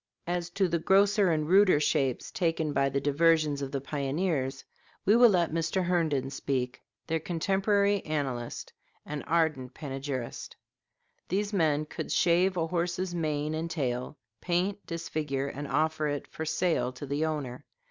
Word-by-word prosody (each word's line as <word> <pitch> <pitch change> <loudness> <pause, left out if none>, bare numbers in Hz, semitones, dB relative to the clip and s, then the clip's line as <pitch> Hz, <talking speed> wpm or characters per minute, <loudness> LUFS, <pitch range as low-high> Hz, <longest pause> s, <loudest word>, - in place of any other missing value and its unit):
As 175 0 -2
to 195 -2 +3
the 170 -1 0
grosser 195 +3 +4
and 155 -1 0
ruder 185 -3 +5
shapes 140 -4 0
taken 165 -4 0
by 135 -1 +2
the 135 +1 0
diversions 150 0 +2
of 135 -1 -4
the 140 - -1
pioneers, 140 -1 -2 0.4
we 205 - +5
will 240 0 +8
let 175 -5 +2
Mr. 165 +3 0
Herndon 155 -7 0
speak 130 -2 -2 0.2
their 165 0 -1
contemporary 195 +4 +1
annalist 135 -6 -3 0.3
and 150 -1 -5
ardent 155 -6 0
panegyrist: 135 -4 -5 0.7
"These 205 +3 -1
men 155 -5 +2
could - - -6
shave 180 +2 +3
a 165 - +1
horse's 175 +2 -2
mane 155 -2 -1
and 160 +1 -3
tail, 130 -3 -2 0.2
paint, 185 +3 0
disfigure, 150 -5 -3
and 145 +1 -6
offer 155 0 +1
it 145 -1 -2
for 160 - -6
sale 160 -5 +1
to 130 +3 -7
the 145 +3 -1
owner. 145 -4 -4
155 Hz, 150 wpm, -29 LUFS, 140-175 Hz, 0.7 s, will